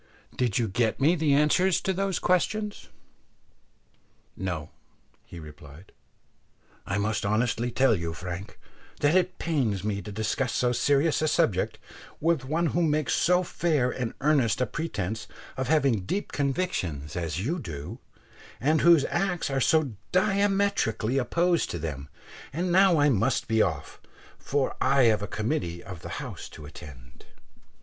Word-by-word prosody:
Did 120 -5 0
you 115 - +1
get 110 +2 0
me 150 +5 +4
the 155 -4 +2
answers 160 +5 +3
to 190 - 0
those 195 0 -1
questions?" 205 +4 -1 1.5
"No," 90 -5 -4 0.6
he 85 - -10
replied, 75 +2 -13 1.0
"I 95 - -1
must 105 +2 -1
honestly 115 +3 0
tell 125 -1 +3
you, 85 -3 -3
Frank, 90 +3 -7 0.4
that 145 +2 +3
it 185 0 +2
pains 125 - -1
me 100 -1 -2
to 105 - -8
discuss 110 +4 -1
so 125 -1 +1
serious 145 +5 +2
a 155 - +2
subject 95 -10 +1 0.4
with 165 -3 +1
one 160 +5 0
who 175 - +1
makes 155 -2 +1
so 180 +1 +3
fair 150 -8 0
and 125 -3 -4
earnest 135 -7 +2
a 125 - +2
pretence 110 - -4 0.3
of 130 -1 -2
having 140 -7 +3
deep 205 - -2
convictions 130 - -2
as 85 +2 -3
you 170 +7 -1
do, 75 - -7 0.6
and 155 +5 +2
whose 170 -4 +6
acts 175 -5 -1
are 135 0 0
so 155 -1 +3 0.2
diametrically 195 - +1
opposed 170 +6 +1
to - - -3
them; 75 -3 -5 0.4
and 175 +5 -2
now 185 -2 +5
I 145 0 +4
must 115 0 +1
be 110 0 +2
off, 80 -8 -2 0.4
for 140 -1 -1
I 135 -1 +4
have 110 -3 +4
a 105 - -3
committee 100 - -3
of 90 -4 -9
the - - -8
House - - -7
to 75 - -10
attend." 65 -5 -13
130 Hz, 150 wpm, -27 LUFS, 100-160 Hz, 1.5 s, whose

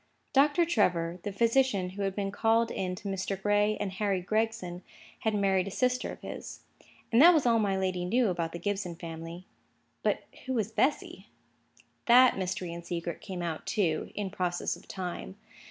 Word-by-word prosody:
Doctor 290 +5 +4
Trevor, 180 - +1
the 205 - -4
physician 230 -3 +2
who 200 +2 -6
had 195 -1 -1
been 195 -1 -2
called 225 +2 +2
in 185 -1 -2
to 200 - -8
Mr. 195 0 -2
Gray 205 +1 +2
and 205 -2 -3
Harry 195 0 0
Gregson, 215 -2 -2 0.4
had 220 -1 0
married 195 -2 +2
a - - -2
sister 250 +5 0
of - - -10
his. - - -8 0.5
And 235 +3 +5
that 345 +3 +9
was 300 - +2
all 230 -1 +4
my 200 -3 +1
lady 185 -2 -1
knew 230 +5 +2
about 170 -2 -2
the 170 - -5
Gibson 195 -1 -3
family. 165 +1 -8 0.6
But - - 0 0.2
who 260 - -1
was 225 -3 -1
Bessy? 270 +6 0 0.8
That 250 +1 +7
mystery 185 -2 -3
and 170 0 -7
secret 170 -1 -4
came 185 -3 -5
out, 165 -2 -4
too, 165 -7 0
in 200 -2 -3
process 175 -1 -1
of - - -17
time. 185 +1 -6
195 Hz, 180 wpm, -29 LUFS, 180-225 Hz, 0.8 s, that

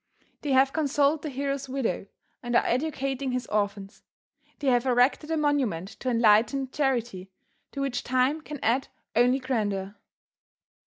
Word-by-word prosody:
They 290 - -2
have 265 +1 +4
consoled 290 0 +2
the 310 - -4
hero's 275 0 -3
widow 255 -8 -2 0.3
and 240 -1 -3
are - - +4
educating 270 -1 -1
his 250 -1 -2
orphans. 200 -1 -3 0.6
They 290 - -7
have 245 0 +2
erected 255 +5 +2
a 325 - 0
monument 265 - 0
to 255 - -2
enlightened 235 +3 +3
charity 235 -9 -1 0.4
to 275 - -5
which 265 -3 -2
time 255 +5 +1
can 295 -1 -8
add 250 +4 +1 0.3
only 245 +3 +4
grandeur. 205 -7 -2
255 Hz, 145 wpm, -27 LUFS, 230-275 Hz, 0.6 s, have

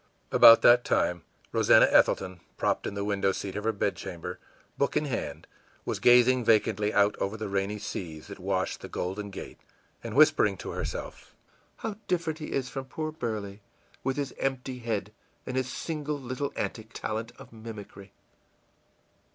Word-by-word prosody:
î - - -3
About 115 0 +9
that 120 0 +7
time 90 -1 +1 0.3
Rosannah - - +6
Ethelton, 95 -2 +3 0.2
propped - - 0
in - - -5
the 100 - -2
window 100 -1 +1
seat 95 0 -5
of 105 - -3
her 115 - +3
bedchamber, 95 -4 -4 0.4
book 140 - 0
in 150 - +1
hand, 135 -5 -4 0.4
was - - -2
gazing 125 +1 +5
vacantly 105 -2 +2
out 100 0 +3
over 100 +3 -2
the 110 -1 -4
rainy 100 +1 -1
seas 80 -6 -6
that - - -10
washed - - -2
the - - -8
Golden 100 +3 -4
Gate, 95 - -9 0.4
and 115 -1 -5
whispering 150 -10 +5
to - - -6
herself, - - -6 0.5
ìHow 215 -2 -4
different 165 -3 -1
he 155 - -6
is 130 -2 -1
from 135 +1 -5
poor 155 +4 -4
Burley, 110 -8 -5 0.4
with 135 +1 -1
his 140 -3 -2
empty 130 -1 -2
head 110 -3 -3 0.3
and 130 - -4
his 130 -1 0
single 150 -1 -3
little 130 +2 -4
antic 110 0 -4
talent 110 +2 -4
of 130 -3 -14
mimicry! 105 -3 -10
115 Hz, 165 wpm, -28 LUFS, 100-135 Hz, 0.5 s, About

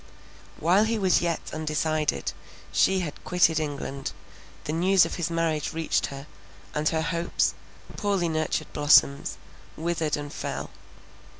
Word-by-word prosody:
While 185 +7 +4
he 225 +1 0
was 190 -4 +3
yet 170 -2 -2
undecided, 155 0 -1 0.4
she 190 -1 +3
had 155 -5 -6
quitted 170 -3 +3
England; 140 -2 -4 0.5
the 150 - -3
news 185 +3 +4
of - - -5
his 175 -1 -2
marriage 165 -2 -1
reached 160 0 0
her, 140 0 -8 0.5
and 150 +1 +1
her 160 -1 0
hopes, 170 +1 0 0.4
poorly 200 -4 +1
nurtured 155 -1 -1
blossoms, 145 -1 +4 0.4
withered 160 -2 -1
and 145 -1 -6
fell. - - -4
160 Hz, 130 wpm, -26 LUFS, 150-175 Hz, 0.5 s, While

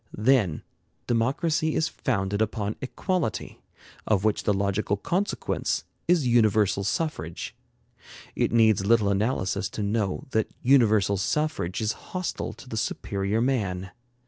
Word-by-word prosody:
Then, 105 - +2 0.4
democracy 150 +7 +1
is 160 - +2
founded 100 -4 -1
upon 105 -1 -1
equality, 145 - -2 0.5
of 100 -3 +2
which 110 -1 +1
the - - +3
logical 100 +1 0
consequence 185 - -1 0.2
is 175 -6 +3
universal 110 -4 +3
suffrage. 95 - -3 0.8
It - - +1
needs 110 -4 +4
little 105 -1 +3
analysis 100 -2 0
to 105 - -4
know 100 -1 -1
that 110 -1 +1
universal 110 -7 +4
suffrage 115 - -1
is 110 0 +1 0.3
hostile 185 - -3
to - - -14
the 110 - -5
superior 100 0 -1
man. 95 -8 -1
110 Hz, 120 wpm, -26 LUFS, 100-130 Hz, 0.8 s, needs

